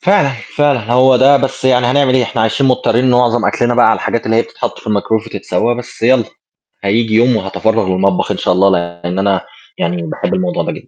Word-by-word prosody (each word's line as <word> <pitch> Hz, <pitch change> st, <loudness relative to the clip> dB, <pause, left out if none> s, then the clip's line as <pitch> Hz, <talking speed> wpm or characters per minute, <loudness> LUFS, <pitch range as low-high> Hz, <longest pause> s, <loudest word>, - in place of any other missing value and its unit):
فعلًا، 180 Hz, -7 st, +2 dB, 0.3 s
فعلًا 135 Hz, -6 st, +1 dB
هو 130 Hz, +1 st, +4 dB
ده، 135 Hz, +3 st, +5 dB
بس 135 Hz, -1 st, -3 dB
يعني 125 Hz, -2 st, +3 dB
هنعمل 130 Hz, 0 st, +2 dB
إيه؟ 130 Hz, -, +3 dB
إحنا 115 Hz, -1 st, -3 dB
عايشين 115 Hz, +5 st, 0 dB
مضطرين 125 Hz, -1 st, +1 dB
إن 130 Hz, -, +3 dB
معظم 120 Hz, -2 st, +2 dB
أكْلنا 120 Hz, 0 st, 0 dB
بقى 120 Hz, -1 st, +4 dB
على 110 Hz, -, +4 dB
الحاجات 115 Hz, -, -3 dB
اللي 115 Hz, 0 st, +1 dB
هي 115 Hz, -, +3 dB
بتتحط -, -, -6 dB
في -, -, -17 dB
الميكرويف 110 Hz, +1 st, -1 dB
وتتسوّى 105 Hz, +2 st, -2 dB
بس 125 Hz, -1 st, -10 dB
يالّا، 120 Hz, 0 st, +3 dB, 0.6 s
هييجي 110 Hz, +3 st, 0 dB
يوم 120 Hz, +2 st, +3 dB
وهاتفرَّغ 110 Hz, +1 st, -1 dB
للمطبخ 95 Hz, 0 st, 0 dB
إن -, -, -3 dB
شاء -, -, 0 dB
الله، 95 Hz, +2 st, +3 dB
لإن 85 Hz, 0 st, -3 dB
أنا 95 Hz, -1 st, +1 dB, 0.4 s
يعني 85 Hz, 0 st, -2 dB
باحب 80 Hz, -, -4 dB
الموضوع 90 Hz, -1 st, -1 dB
ده -, -, -3 dB
جدًا. -, -, -10 dB
115 Hz, 215 wpm, -14 LUFS, 100-125 Hz, 0.6 s, ده